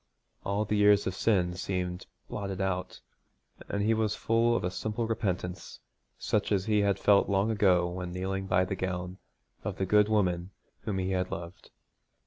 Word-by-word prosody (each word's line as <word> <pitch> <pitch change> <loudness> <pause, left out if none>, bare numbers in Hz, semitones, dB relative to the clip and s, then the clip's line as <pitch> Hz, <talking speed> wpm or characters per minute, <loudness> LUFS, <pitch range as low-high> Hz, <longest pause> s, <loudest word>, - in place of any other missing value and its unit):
All 100 +2 0
the 105 - -1
years 105 0 +5
of 95 - -1
sin 95 -3 +1
seemed 90 0 -3 0.2
blotted 100 -2 -4
out, 95 -1 -2 0.7
and 100 0 -1
he 110 +2 +3
was 110 -1 0
full 115 +1 +2
of - - -1
a 90 - -1
simple 110 +4 -2
repentance 95 -5 -3 0.4
such 105 0 -1
as 95 -2 +1
he 105 -1 +2
had 100 -1 +2
felt 100 0 +4
long 100 +3 +2
ago 95 -5 +3
when 90 0 -5
kneeling 95 +1 -3
by 90 0 +3
the 95 - -3
gown 90 0 -4 0.4
of - - -4
the 95 - 0
good 105 +2 +4
woman 90 -4 +1 0.4
whom 100 -3 -1
he 95 0 -1
had 90 -1 0
loved. 85 +2 -8
95 Hz, 175 wpm, -29 LUFS, 90-105 Hz, 0.7 s, years